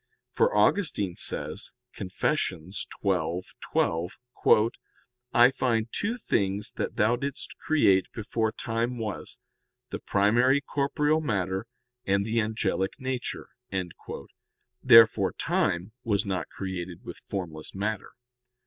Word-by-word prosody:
For 470 Hz, +2 st, +2 dB
Augustine 105 Hz, -, +2 dB
says -, -, -2 dB, 0.2 s
(Confess. 100 Hz, +11 st, -1 dB
xii, 90 Hz, +2 st, -5 dB, 0.2 s
12): 90 Hz, -2 st, -1 dB, 1.2 s
"I 120 Hz, +2 st, +6 dB
find 115 Hz, -4 st, 0 dB
two 220 Hz, +4 st, -1 dB
things 100 Hz, -, 0 dB
that -, -, -4 dB
Thou 110 Hz, +3 st, +3 dB
didst 140 Hz, +2 st, -5 dB
create 100 Hz, -, +3 dB
before 110 Hz, 0 st, -1 dB
time 115 Hz, +3 st, -2 dB
was, 110 Hz, -4 st, -4 dB, 0.5 s
the -, -, -3 dB
primary 120 Hz, +7 st, +3 dB
corporeal 150 Hz, +2 st, 0 dB
matter, 95 Hz, -, -1 dB, 0.4 s
and 100 Hz, +1 st, +1 dB
the 115 Hz, +1 st, +1 dB
angelic 105 Hz, -3 st, -1 dB
nature. 130 Hz, -1 st, -4 dB, 1.3 s
"Therefore 115 Hz, -1 st, +7 dB
time 85 Hz, +5 st, 0 dB
was 105 Hz, -1 st, +1 dB
not 95 Hz, -2 st, -2 dB
created 95 Hz, -2 st, -6 dB
with -, -, -8 dB
formless 80 Hz, -5 st, -5 dB
matter. 105 Hz, +1 st, -3 dB
110 Hz, 105 wpm, -27 LUFS, 95-125 Hz, 1.3 s, Therefore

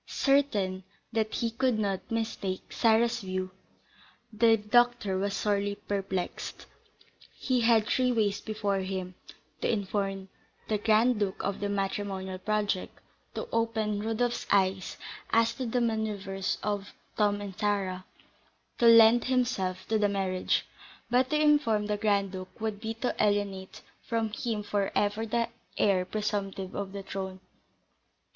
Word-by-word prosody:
Certain 210 Hz, -10 st, +1 dB, 0.3 s
that 220 Hz, -1 st, 0 dB
he 230 Hz, -1 st, -1 dB
could 250 Hz, 0 st, +1 dB
not 200 Hz, -3 st, -2 dB
mistake 220 Hz, -4 st, -3 dB
Sarah's 230 Hz, 0 st, +3 dB
views, 185 Hz, -2 st, -3 dB, 0.8 s
the 225 Hz, +1 st, +5 dB
doctor 235 Hz, -1 st, +2 dB
was 200 Hz, 0 st, -1 dB
sorely 205 Hz, -1 st, 0 dB
perplexed. 195 Hz, -3 st, -4 dB, 0.7 s
He 255 Hz, -2 st, 0 dB
had 225 Hz, -2 st, +4 dB
three 250 Hz, +3 st, +2 dB
ways 210 Hz, -4 st, +1 dB
before 205 Hz, -2 st, -1 dB
him, 185 Hz, -1 st, -4 dB, 0.5 s
to -, -, +1 dB
inform 195 Hz, -2 st, -2 dB, 0.4 s
the 215 Hz, -1 st, 0 dB
Grand 225 Hz, +2 st, +3 dB
Duke 195 Hz, -2 st, -1 dB
of 200 Hz, 0 st, -2 dB
the 205 Hz, -, -2 dB
matrimonial 195 Hz, -1 st, -2 dB
project, 205 Hz, -2 st, -1 dB, 0.4 s
to 485 Hz, -, -4 dB
open 220 Hz, -2 st, 0 dB
Rodolph's 225 Hz, +2 st, -1 dB
eyes 190 Hz, -1 st, +1 dB, 0.3 s
as 230 Hz, 0 st, +3 dB
to 260 Hz, -2 st, -4 dB
the 245 Hz, +2 st, 0 dB
manoeuvres 210 Hz, -4 st, -1 dB
of 205 Hz, -1 st, -2 dB, 0.2 s
Tom 205 Hz, -1 st, +2 dB
and 200 Hz, -2 st, -7 dB
Sarah, 195 Hz, -3 st, -1 dB, 0.8 s
to 235 Hz, -, +5 dB
lend 230 Hz, +1 st, +8 dB
himself 195 Hz, -8 st, 0 dB
to 220 Hz, -1 st, +2 dB
the 205 Hz, -1 st, +3 dB
marriage. 190 Hz, -2 st, 0 dB, 0.5 s
But 255 Hz, +1 st, +3 dB
to 300 Hz, -, +2 dB
inform 290 Hz, -9 st, +3 dB
the 210 Hz, 0 st, -1 dB
Grand 200 Hz, -2 st, +1 dB
Duke 185 Hz, +2 st, -8 dB
would 215 Hz, -2 st, -3 dB
be 225 Hz, 0 st, -3 dB
to 245 Hz, +2 st, -2 dB
alienate 200 Hz, -2 st, -1 dB, 0.2 s
from 225 Hz, -2 st, -1 dB
him 215 Hz, -1 st, -3 dB
for 205 Hz, -1 st, -1 dB
ever 210 Hz, +2 st, +1 dB
the 235 Hz, +1 st, 0 dB, 0.3 s
heir 190 Hz, -3 st, +3 dB
presumptive 195 Hz, -2 st, -3 dB
to 200 Hz, -, -3 dB
the 195 Hz, +1 st, -8 dB
throne. 190 Hz, -1 st, -5 dB
210 Hz, 140 wpm, -29 LUFS, 195-225 Hz, 0.8 s, lend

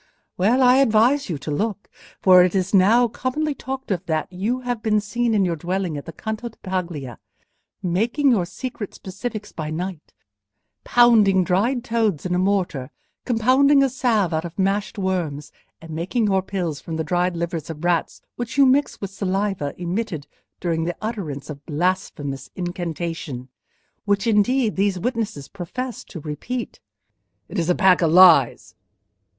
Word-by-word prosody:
Well, 230 Hz, +8 st, +3 dB
I 250 Hz, +1 st, +6 dB
advise 260 Hz, +2 st, +3 dB
you 165 Hz, -, -2 dB
to 150 Hz, -, -6 dB
look; 205 Hz, +6 st, -2 dB, 0.3 s
for 185 Hz, -1 st, +7 dB
it 180 Hz, +1 st, 0 dB
is 190 Hz, +1 st, 0 dB
now 220 Hz, +6 st, +5 dB
commonly 285 Hz, +6 st, -2 dB
talked 265 Hz, -3 st, -6 dB
of 180 Hz, -2 st, -1 dB
that 160 Hz, +3 st, -2 dB
you 220 Hz, +8 st, -1 dB
have 245 Hz, -3 st, -3 dB
been 215 Hz, -1 st, +2 dB
seen 230 Hz, +2 st, -1 dB
in 200 Hz, -2 st, +3 dB
your 170 Hz, -2 st, 0 dB
dwelling 180 Hz, +1 st, -2 dB
at 145 Hz, -, -6 dB
the -, -, -5 dB
Canto 220 Hz, +7 st, -5 dB
di 225 Hz, -, -23 dB
Paglia, 170 Hz, -, -4 dB, 0.6 s
making 230 Hz, -, +2 dB
your 185 Hz, -7 st, +1 dB
secret 215 Hz, +1 st, -6 dB
specifics 210 Hz, +2 st, -6 dB
by 155 Hz, -2 st, -5 dB
night: 170 Hz, +1 st, -6 dB, 0.7 s
pounding 215 Hz, -6 st, +5 dB
dried 225 Hz, +8 st, +1 dB
toads 225 Hz, -, 0 dB
in 180 Hz, -, -1 dB
a 180 Hz, -, +1 dB
mortar, 185 Hz, -9 st, 0 dB, 0.4 s
compounding 265 Hz, +4 st, +4 dB
a 270 Hz, -, +2 dB
salve 225 Hz, -9 st, +1 dB
out 160 Hz, 0 st, 0 dB
of 170 Hz, -1 st, -8 dB
mashed 195 Hz, +2 st, 0 dB
worms, 175 Hz, -7 st, -2 dB, 0.3 s
and 165 Hz, 0 st, -11 dB
making 180 Hz, +9 st, -1 dB
your 195 Hz, -2 st, +2 dB
pills 180 Hz, -6 st, -3 dB
from 165 Hz, -, -6 dB
the 160 Hz, -, -1 dB
dried 175 Hz, +3 st, 0 dB
livers 170 Hz, -2 st, -3 dB
of 160 Hz, 0 st, -7 dB
rats 175 Hz, -2 st, 0 dB
which 240 Hz, +2 st, -5 dB
you 280 Hz, -, +7 dB
mix 270 Hz, +3 st, +2 dB
with 200 Hz, -1 st, -4 dB
saliva 195 Hz, -6 st, -2 dB
emitted 175 Hz, -3 st, -3 dB, 0.3 s
during 165 Hz, -2 st, -1 dB
the 175 Hz, 0 st, -3 dB
utterance 195 Hz, -11 st, -5 dB
of 150 Hz, -2 st, -7 dB
a 145 Hz, -, -13 dB
blasphemous 150 Hz, -5 st, -2 dB
incantation—which 170 Hz, +1 st, -5 dB
indeed 230 Hz, +2 st, +2 dB
these 195 Hz, -1 st, +1 dB
witnesses 220 Hz, -, -3 dB
profess 235 Hz, +7 st, -6 dB
to 170 Hz, -, -9 dB
repeat." 190 Hz, -, -5 dB, 0.7 s
"It -, -, -4 dB
is 165 Hz, 0 st, -1 dB
a 180 Hz, -, +4 dB
pack 190 Hz, -3 st, +4 dB
of 165 Hz, -2 st, +3 dB
lies!" 170 Hz, -8 st, +6 dB
190 Hz, 165 wpm, -22 LUFS, 170-230 Hz, 0.7 s, for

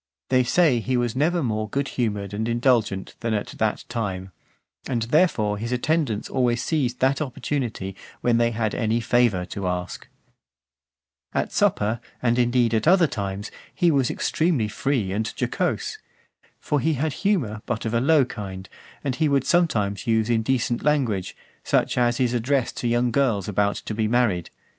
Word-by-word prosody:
They 130 Hz, -1 st, +4 dB
say 140 Hz, -1 st, +3 dB
that -, -, -8 dB
he 130 Hz, -1 st, +1 dB
was 120 Hz, -1 st, -1 dB
never 165 Hz, +4 st, +1 dB
more 110 Hz, -3 st, -1 dB
good 140 Hz, +4 st, -1 dB
humoured 105 Hz, -5 st, -2 dB
and 110 Hz, +2 st, -2 dB
indulgent 115 Hz, -5 st, +1 dB
than 115 Hz, -1 st, -1 dB
at 105 Hz, -, -3 dB
that 110 Hz, -1 st, 0 dB
time: 95 Hz, -6 st, -4 dB, 0.6 s
and 120 Hz, -4 st, -1 dB
therefore 115 Hz, -, +2 dB
his 115 Hz, +2 st, -4 dB
attendants 125 Hz, -3 st, 0 dB
always 125 Hz, -2 st, 0 dB
seized 130 Hz, -6 st, -1 dB
that 135 Hz, +2 st, +2 dB
opportunity, 125 Hz, -8 st, -3 dB, 0.3 s
when 120 Hz, -1 st, +3 dB
they 115 Hz, 0 st, +3 dB
had 110 Hz, -2 st, -1 dB
any 115 Hz, 0 st, 0 dB
favour 115 Hz, -6 st, +2 dB
to 95 Hz, +1 st, -4 dB
ask. 90 Hz, 0 st, -4 dB
XXII. -, -, -36 dB, 1.3 s
At -, -, -13 dB
supper, 110 Hz, +3 st, +1 dB, 0.2 s
and, 120 Hz, 0 st, +1 dB
indeed, 120 Hz, -1 st, +2 dB
at 110 Hz, +6 st, +1 dB
other 180 Hz, 0 st, +6 dB
times, 100 Hz, -5 st, -4 dB, 0.2 s
he 175 Hz, -1 st, +3 dB
was 135 Hz, -4 st, +2 dB
extremely 155 Hz, -9 st, 0 dB
free 105 Hz, -1 st, -1 dB
and 110 Hz, +3 st, -1 dB
jocose. -, -, -1 dB, 0.6 s
For 145 Hz, -, 0 dB
he 160 Hz, +3 st, +1 dB
had 150 Hz, +2 st, -1 dB
humour, 140 Hz, -, 0 dB
but 120 Hz, -2 st, -2 dB
of 110 Hz, -, -2 dB
a 115 Hz, -, +2 dB
low 145 Hz, 0 st, +4 dB
kind, 95 Hz, -5 st, -7 dB, 0.4 s
and 135 Hz, -, -1 dB
he 155 Hz, +1 st, +2 dB
would 140 Hz, -2 st, +2 dB
sometimes 110 Hz, -, +1 dB
use 110 Hz, 0 st, +2 dB
indecent 120 Hz, +1 st, +1 dB
language, 125 Hz, -11 st, 0 dB, 0.3 s
such -, -, +1 dB
as 120 Hz, -1 st, +2 dB
is 125 Hz, -2 st, +1 dB
addressed 125 Hz, +2 st, 0 dB
to 120 Hz, -, -1 dB
young 120 Hz, +1 st, +2 dB
girls 115 Hz, -7 st, +1 dB
about 100 Hz, 0 st, +1 dB
to -, -, -5 dB
be 110 Hz, 0 st, 0 dB
married. 110 Hz, -7 st, +1 dB
120 Hz, 170 wpm, -24 LUFS, 105-135 Hz, 1.3 s, other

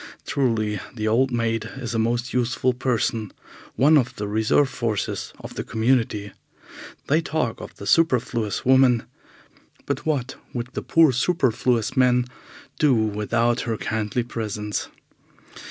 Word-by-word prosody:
Truly, 110 Hz, -6 st, 0 dB, 0.2 s
the 110 Hz, -2 st, -2 dB
old 125 Hz, +5 st, +3 dB
maid 115 Hz, -2 st, -1 dB
is 120 Hz, -4 st, -5 dB
a 115 Hz, -, 0 dB
most 120 Hz, +2 st, -1 dB
useful 125 Hz, +1 st, +1 dB
person, 115 Hz, -4 st, -1 dB, 0.4 s
one 150 Hz, +3 st, +5 dB
of 125 Hz, -2 st, -2 dB
the 105 Hz, -, -4 dB
reserve 110 Hz, +7 st, +2 dB
forces 115 Hz, -6 st, -3 dB
of -, -, -9 dB
the -, -, -4 dB
community. 110 Hz, -3 st, 0 dB, 0.7 s
They 155 Hz, +3 st, +2 dB
talk 150 Hz, -8 st, -2 dB
of -, -, -9 dB
the 100 Hz, -, -9 dB
superfluous 120 Hz, -4 st, +1 dB
woman, 130 Hz, -2 st, +5 dB, 0.8 s
but -, -, -2 dB
what 140 Hz, -5 st, -2 dB, 0.2 s
would 120 Hz, 0 st, -4 dB
the -, -, -3 dB
poor 165 Hz, -3 st, +4 dB
superfluous 125 Hz, -4 st, +1 dB
man 125 Hz, -1 st, +4 dB, 0.5 s
do 145 Hz, -4 st, +4 dB
without 115 Hz, +2 st, +1 dB
her 115 Hz, -2 st, -2 dB
kindly 110 Hz, +3 st, -2 dB
presence? 105 Hz, -3 st, -4 dB
120 Hz, 135 wpm, -23 LUFS, 110-130 Hz, 0.8 s, one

